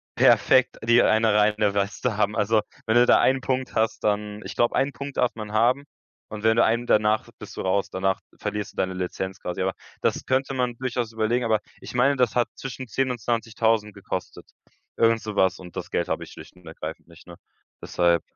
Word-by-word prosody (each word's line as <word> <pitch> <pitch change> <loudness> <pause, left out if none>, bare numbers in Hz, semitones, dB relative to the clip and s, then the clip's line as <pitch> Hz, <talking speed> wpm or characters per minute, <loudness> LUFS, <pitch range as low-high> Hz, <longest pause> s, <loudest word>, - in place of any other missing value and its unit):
perfekt, 130 -1 +4
die 115 +2 +5
eine 110 0 +3
reine 105 -1 +2
Weste 100 +3 -1
haben. 105 0 +1
Also, 105 +1 +2 0.2
wenn 110 - +1
du 120 0 +6
da - - +5
einen 130 0 +3
Punkt 130 0 -2
hast, 110 0 0
dann 105 0 -1
ich - - -7
glaube, 120 - +2
einen 140 +1 +1
Punkt 140 0 -7
darf 125 - +2
man 105 -2 -7
haben. 120 +6 +2 0.5
Und 105 0 -7
wenn 110 0 +4
du - - +6
einen 115 +2 0
danach 105 0 +2
bist - - -10
du - - -2
raus. 95 +1 0
Danach 95 +1 -1 0.2
verlierst 105 0 -4
du - - -28
deine 95 0 0
Lizenz 95 +1 -4
quasi. 90 +1 -4
Aber 95 0 0 0.3
Das - - 0
könnte 135 +1 0
man 125 -2 -1
durchaus 120 -2 -2
überlegen. 115 +2 0
Aber 110 -2 +2 0.2
ich - - -9
meine, 130 +3 +3
das 125 -4 +1
hat 120 -1 +2
zwischen 130 -1 -7
10 130 +3 0
und 125 - -4
20.000 110 -1 0
gekostet. - - -6 0.5
Irgend 115 0 +3
sowas. 95 -3 0
Und 90 -2 -12
das - - -5
Geld - - 0
habe - - -2
ich - - -12
schlicht - - -13
und 90 -1 -20
ergreifend 80 0 -8
nicht, 85 0 -17
ne? 85 - -10 0.5
Deshalb. 85 -1 +2
110 Hz, 210 wpm, -24 LUFS, 100-120 Hz, 0.5 s, du